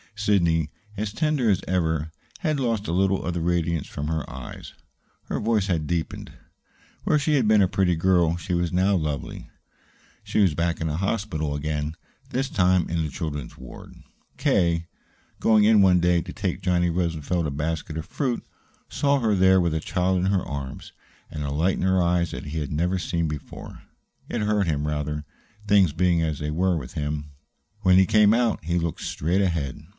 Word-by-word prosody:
Sidney, 85 -7 +2 0.3
as 105 0 -3
tender 150 -4 +1
as 95 - +1
ever, 80 -4 0 0.3
had 155 -5 0
lost 115 -5 -1
a - - -1
little 95 +2 +1
of 90 - -1
the 85 - -2
radiance 85 -2 0
from 75 +1 -5
her 80 -1 -2
eyes; 65 -1 -9 0.5
her - - -3
voice 110 -2 +1
had 85 -6 -1
deepened. 85 -1 -3 0.7
Where 155 - +3
she 150 +1 +1
had 125 -6 +2
been 105 -1 +5
a 95 - +4
pretty 95 -2 +1
girl, 85 -1 +3
she 90 +1 -4
was 85 -1 0
now 95 +3 +2
lovely. 75 -5 -3 0.7
She - - -1
was 95 -6 +4
back 85 +1 -1
in 80 - -1
the 75 0 -2
hospital 90 -6 -2
again, 75 +1 -3 0.3
this 135 +2 -1
time 90 -4 +2
in 85 0 -1
the 75 - -3
children's 75 -2 -5
ward. - - -11 0.4
K., 85 -1 +1 0.5
going 110 -1 +4
in 105 -1 +6
one 90 -2 +5
day 85 0 +3
to - - -8
take - - -3
Johnny 90 -1 +2
Rosenfeld 85 -1 -1
a - - -3
basket 75 +2 -3
of 80 - -4
fruit, 125 - -2 0.5
saw 140 -1 +1
her 110 -3 +2
there 95 -1 +5
with 85 -3 +1
a 80 - 0
child 90 +3 0
in 90 - 0
her 95 -2 +1
arms, 70 -2 -6 0.4
and 75 - -4
a 70 - -3
light 80 +6 +1
in - - -3
her 95 0 +3
eyes 85 -1 +1
that - - -6
he 80 +2 -3
had 75 - -4
never 90 +5 0
seen 85 -1 -1
before. 75 -2 -8 0.5
It - - -2
hurt 105 -2 +1
him, 75 -2 -1
rather 75 0 -3 0.4
things 100 -6 +4
being 85 0 +2
as 80 -2 -1
they 75 +1 -3
were 90 +2 +1
with 65 -4 -7
him. 75 -1 -3 0.5
When 95 -2 +5
he 95 - +6
came 105 +2 +5
out 120 -6 +1
he 85 +2 0
looked 85 -1 -2
straight 85 +6 0
ahead. 80 -8 -1
85 Hz, 190 wpm, -24 LUFS, 80-95 Hz, 0.7 s, in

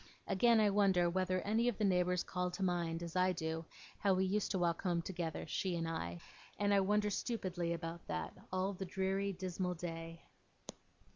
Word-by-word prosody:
Again, 230 +3 +4
I 210 -2 +4
wonder 190 -4 +4
whether 185 0 +1
any 220 +5 +1
of 245 - +1
the 215 - -1
neighbours 180 -2 +2
call 180 -1 -2
to 180 +2 -4
mind, 170 -2 0
as 170 0 -6
I 185 0 +3
do, 160 -1 -3 0.3
how 195 -3 +3
we 190 +1 +2
used 205 +2 0
to 195 - 0
walk 170 -2 +1
home 175 -3 0
together, 170 -3 -3
she 185 -2 -1
and 165 -1 -1
I; 85 - -3 0.4
and 205 0 +2
I 200 - +6
wonder 210 +2 +2
stupidly 185 -7 -2
about 170 0 -5
that, 80 -1 -3 0.2
all 185 +2 0
the 190 - -5
dreary 190 +2 0
dismal 180 -1 -2
day. 165 -1 -6
180 Hz, 190 wpm, -36 LUFS, 170-195 Hz, 0.4 s, I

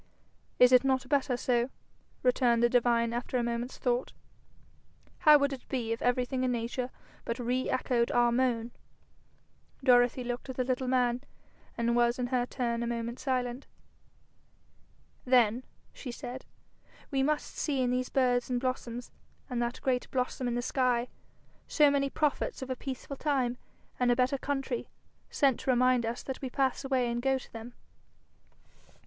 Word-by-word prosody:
'Is 250 0 +7
it 255 0 +7
not 265 -1 +1
better 275 -3 +1
so?' 245 0 +1 0.5
returned 245 -2 +3
the 240 - +5
divine 235 -1 +2
after 240 +1 -2
a 240 - 0
moment's 235 +1 -3
thought. 245 0 -1 1.1
'How 300 -1 +8
would 280 -1 0
it 260 - -9
be 235 -4 -2
if 230 - -2
everything 250 +1 0
in 255 - +1
nature 245 +1 -2 0.3
but 235 - -3
re 250 +1 -1
echoed 245 -2 +1
our 240 0 +3
moan?' 240 -2 0 1.1
Dorothy 245 -1 +4
looked 245 +2 -5
at 260 - -6
the 255 - +1
little 255 0 -1
man, 250 -1 +2 0.6
and 235 0 +1
was 240 0 +3
in 250 - -1
her 245 -1 +1
turn 235 -3 -2
a 235 - -2
moment 235 0 -3
silent. 255 -1 -2 1.6
'Then,' 245 -1 +3 0.3
she 255 - -7
said, 245 +2 -7 0.7
'we 270 -1 +1
must 300 +2 -1
see 275 -4 0
in 245 - +1
these 250 0 -1
birds 250 -2 +1
and 250 -1 0
blossoms, 245 -1 -4 0.4
and 240 -1 -1
that 240 0 -2
great 255 -2 0
blossom 255 0 -2
in 240 - -1
the 240 - -1
sky, 250 -2 +1 0.6
so 295 -2 +4
many 275 -1 +1
prophets 300 - -1
of 260 - -5
a - - -1
peaceful 270 +2 -6
time 260 -5 0 0.4
and 250 -1 +3
a 245 - +4
better 255 +2 +1
country, 270 -4 -2 0.4
sent 275 -5 +2
to - - -4
remind 250 -1 +3
us 235 +1 -4
that 265 - -6
we 265 - -3
pass 265 +1 0
away 260 -2 +1
and 235 0 -2
go 265 +1 +2
to 260 - -12
them.' 230 +2 -9
250 Hz, 165 wpm, -30 LUFS, 240-260 Hz, 1.6 s, How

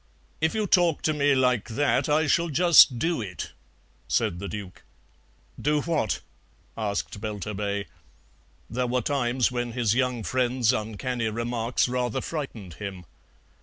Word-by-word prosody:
"If 160 +4 +1
you 215 -1 +1
talk 175 -5 +3
to 155 - +2
me 145 -1 +3
like 125 -4 +2
that 135 +3 +1
I 155 +2 +3
shall 170 +4 +2
just 160 -4 +6
DO 165 +2 0
it," 95 -8 -6 0.6
said 85 - 0
the 100 - -5
Duke. 100 -4 -7 0.8
"Do 150 +1 +2
what?" 155 -11 0 0.5
asked 100 -1 -3
Belturbet. 105 -1 -3 0.8
There 125 +2 -1
were 125 +1 0
times 125 -3 +1
when 120 -1 -3
his 115 -4 +1
young 125 -2 0
friend's 125 0 +1
uncanny 115 +2 -2
remarks 115 +2 0
rather 125 -2 -1
frightened 120 - -5
him. 95 -3 -6
125 Hz, 135 wpm, -26 LUFS, 110-145 Hz, 0.8 s, just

